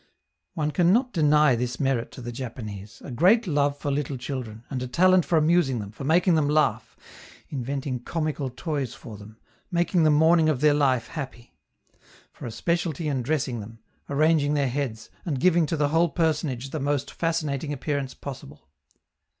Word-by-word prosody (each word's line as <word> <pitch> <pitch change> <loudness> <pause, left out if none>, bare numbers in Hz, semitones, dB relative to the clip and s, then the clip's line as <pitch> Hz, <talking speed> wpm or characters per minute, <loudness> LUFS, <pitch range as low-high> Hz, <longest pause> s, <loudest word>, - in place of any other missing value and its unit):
One 150 -1 -1
can 170 +4 +3
not 245 +4 +2
deny 150 -4 +4
this 120 +1 -3
merit 135 -4 0
to - - -9
the 120 0 -5
Japanese 110 -5 -8
a - - -7
great 190 - +4
love 145 -4 +1
for 145 0 -3
little 140 -1 -2
children, 120 -4 -6
and 130 -2 -3
a 125 - -3
talent 185 +6 +4
for 170 - +2
amusing 155 -4 +3
them, 100 -2 -6
for 110 - -9
making 170 +5 +3
them 155 -3 +2
laugh, 150 0 +1 0.5
inventing 135 -1 -3
comical 155 0 -3
toys 135 -2 -4
for 110 - -10
them, 105 +2 -13 0.3
making 175 -1 +1
the 155 - +5
morning 160 +2 +4
of 145 -5 0
their 150 +1 +4
life 135 -5 +1
happy; 130 -6 -7 0.8
for - - -8
a - - -5
specialty 165 +5 -1
in 135 -3 -1
dressing 130 -2 -1
them, 110 +2 -9 0.3
arranging 150 0 +2
their 140 -3 +1
heads, 125 -4 -4
and 145 -7 -2
giving 170 -1 +3
to 165 - -1
the 145 -1 +1
whole 165 +3 +3
personage 150 -6 -1
the 155 - -3
most 140 0 -1
fascinating 155 -4 -2
appearance 140 -1 -3
possible. 75 - -9
145 Hz, 175 wpm, -25 LUFS, 125-160 Hz, 0.8 s, the